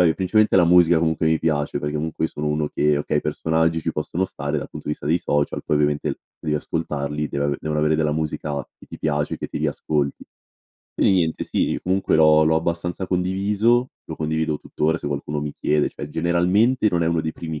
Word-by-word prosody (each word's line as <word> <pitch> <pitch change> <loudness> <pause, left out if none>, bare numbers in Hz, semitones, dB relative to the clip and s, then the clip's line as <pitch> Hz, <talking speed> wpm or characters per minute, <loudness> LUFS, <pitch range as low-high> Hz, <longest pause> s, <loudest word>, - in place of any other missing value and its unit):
principalmente 105 +3 +2
la 90 -2 +6
musica, 85 -1 +5
comunque, 80 0 +1
mi 80 0 +3
piace 75 -3 -1
perché 75 +1 -3
comunque 80 +1 -2
sono 75 -1 -4
uno 75 0 0
che, 75 -1 +2
okay, 75 - -1
i - - -1
personaggi 80 0 0
ci 80 - -2
possono 95 +3 -2
stare 70 -3 -3
dal 70 - -5
punto - - -9
di 75 - +1
vista 70 - -11
dei 80 +4 +2
social, 75 0 -1
poi - - 0
ovviamente 75 0 +1
l - - -4 0.2
devi 75 -1 -1
ascoltarli, 75 -1 -3
deve 70 - -2
ave 70 -1 0
devono 75 -1 -2
avere 75 +1 +2
della 75 -1 +1
musica, 75 -2 -3
che - - -18
ti - - -9
piace, 75 -1 -1
e - - -12
che - - -4
ti - - -5
riascolti. 75 -2 -1 0.7
Quindi - - +2
niente, 85 -4 +1
sì, - - 0
e - - -4
comunque, 95 -1 +1
l'ho 80 0 +6
l'ho 80 +1 +3
abbastanza 85 +3 -2
condiviso, 100 +7 +1 0.2
lo 80 - -5
condivido 80 -1 -1
tuttora, 80 +2 -1
se - - -6
qualcuno 75 +1 -3
mi 75 0 -4
chiede, 75 +1 +1
cioè, 75 - -8
generalmente 90 +9 +2
non 85 -2 +1
è - - 0
uno 85 -1 +1
dei 80 - -2
primi 80 -3 -6
80 Hz, 220 wpm, -22 LUFS, 75-85 Hz, 0.7 s, la